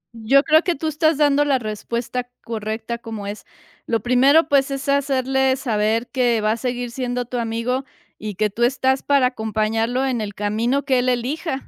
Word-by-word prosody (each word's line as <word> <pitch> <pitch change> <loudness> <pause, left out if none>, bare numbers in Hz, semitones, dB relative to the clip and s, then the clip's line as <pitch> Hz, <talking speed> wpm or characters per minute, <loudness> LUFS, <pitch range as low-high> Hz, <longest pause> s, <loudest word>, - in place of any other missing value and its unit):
Yo 250 +6 +3
creo 315 +1 +5
que 350 -1 -1
tú 315 +3 -4
estás 310 0 +1
dando 290 -1 +3
la 280 -2 +2
respuesta 235 +2 -4
correcta, 220 +1 -4
como 225 -3 -7
es. 205 +1 -7 0.4
Lo 230 -2 0
primero, 275 +6 +4
pues, 280 -2 +3
es 275 0 -4
hacerle 265 -1 +1
saber 225 -2 0
que 245 -4 +2
va 215 0 +1
a 225 - -1
seguir 245 0 -3
siendo 245 -1 -3
tu 245 +1 -5
amigo 235 +3 -1 0.4
y 210 -2 -5
que 210 +1 0
tú 235 - -7
estás 265 +1 +2
para 280 -2 +3
acompañarlo 225 +1 -1
en 245 -4 -1
el 205 -1 -5
camino 230 +7 0
que 260 -3 +2
él 255 +1 +1
elija. 265 +4 -2
245 Hz, 185 wpm, -21 LUFS, 225-270 Hz, 0.4 s, creo